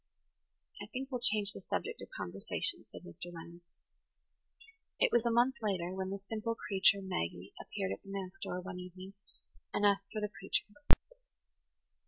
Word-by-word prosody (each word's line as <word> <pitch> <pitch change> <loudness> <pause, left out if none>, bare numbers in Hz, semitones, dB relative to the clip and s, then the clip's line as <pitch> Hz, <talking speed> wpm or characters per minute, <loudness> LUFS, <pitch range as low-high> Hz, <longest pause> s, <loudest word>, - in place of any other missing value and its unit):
"I - - -5
think 265 +2 -4
we'll 250 - 0
change 210 -4 +4
the - - -7
subject - - -2
of - - -7
conversation," 95 +3 -1
said - - -10
Mr. 175 - -7
Leonard. 170 +1 -9 1.4
It - - +5
was 235 0 +5
a - - +5
month 240 +2 +4
later 185 -5 +1
when 190 0 -2
"the 195 - -2
simple 220 +3 -2
creature, 195 -1 +4
Maggie" 85 - -2
appeared 95 - -2
at 100 - -3
the - - -13
manse 195 -1 -4
door 180 - -2
one 185 0 -5
evening 185 +2 -8 0.6
and 205 - +2
asked 200 -1 +4
for 215 - -1
the 210 - +1
preacher. 195 -1 -1
195 Hz, 165 wpm, -35 LUFS, 180-215 Hz, 1.4 s, It